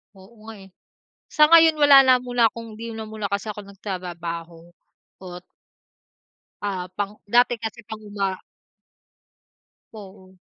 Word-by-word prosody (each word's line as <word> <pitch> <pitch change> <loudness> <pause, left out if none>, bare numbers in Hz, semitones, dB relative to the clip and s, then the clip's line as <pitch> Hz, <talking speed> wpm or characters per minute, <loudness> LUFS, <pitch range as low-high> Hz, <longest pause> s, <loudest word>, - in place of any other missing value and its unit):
Oo 190 +2 -17 0.2
nga, 225 - -9
eh, 190 - -18 0.6
sa 305 - +4
ngayon 325 0 +6
wala 290 -2 +7
na 260 -1 +5
muna 245 -2 +1
kong 230 0 -10
di 230 - -6
na 220 - -6
muna 215 -1 -6
kase 200 +2 -3
ako 210 - -9
nagtratrabaho, 175 -4 -7 0.6
ot 180 0 -10 1.2
Ah, 190 -3 -3
pang 205 +1 -5
dati 240 +2 +2
kasi 225 +1 -7
pang-uma 205 -3 -5 1.5
Oo. 190 -3 -14
210 Hz, 125 wpm, -22 LUFS, 190-235 Hz, 1.5 s, wala